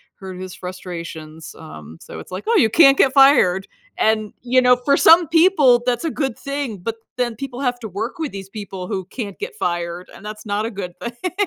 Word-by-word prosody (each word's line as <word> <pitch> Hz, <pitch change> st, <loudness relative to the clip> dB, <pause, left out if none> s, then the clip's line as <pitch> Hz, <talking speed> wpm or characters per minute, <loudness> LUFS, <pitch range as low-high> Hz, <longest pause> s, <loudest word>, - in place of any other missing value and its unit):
heard 190 Hz, -2 st, -9 dB
of -, -, -8 dB
his 185 Hz, -1 st, -8 dB
frustrations. 170 Hz, -3 st, -8 dB
Um, 80 Hz, -, -11 dB
so 80 Hz, -, -10 dB
it's -, -, -12 dB
like, 185 Hz, -, -6 dB
"Oh, 460 Hz, -, +2 dB
you 225 Hz, -, +4 dB
can't 275 Hz, 0 st, +6 dB
get 270 Hz, -, +4 dB
fired." 260 Hz, -10 st, +5 dB, 0.3 s
And, 215 Hz, -1 st, +1 dB
you 250 Hz, +1 st, +3 dB
know, 250 Hz, 0 st, +5 dB
for 280 Hz, +3 st, +2 dB
some 330 Hz, +1 st, +6 dB
people, 315 Hz, -8 st, +4 dB
that's 245 Hz, +4 st, 0 dB
a 320 Hz, -, -1 dB
good 270 Hz, -6 st, -3 dB
thing, 280 Hz, -6 st, -4 dB
but 225 Hz, +6 st, -4 dB, 0.2 s
then 240 Hz, -2 st, -1 dB
people 265 Hz, +1 st, -7 dB
have 250 Hz, -2 st, 0 dB
to 220 Hz, -3 st, -7 dB
work 225 Hz, -, -5 dB
with 310 Hz, -4 st, -3 dB
these 195 Hz, -1 st, -8 dB
people 195 Hz, -3 st, -7 dB
who 190 Hz, -, -3 dB
can't 200 Hz, -1 st, -7 dB
get -, -, -5 dB
fired, 175 Hz, 0 st, -3 dB
and -, -, -14 dB
that's 215 Hz, +1 st, -8 dB
not 205 Hz, +1 st, -1 dB
a 230 Hz, -, -4 dB
good 190 Hz, -4 st, -6 dB
thing. 240 Hz, +10 st, -5 dB
220 Hz, 220 wpm, -20 LUFS, 185-270 Hz, 0.3 s, can't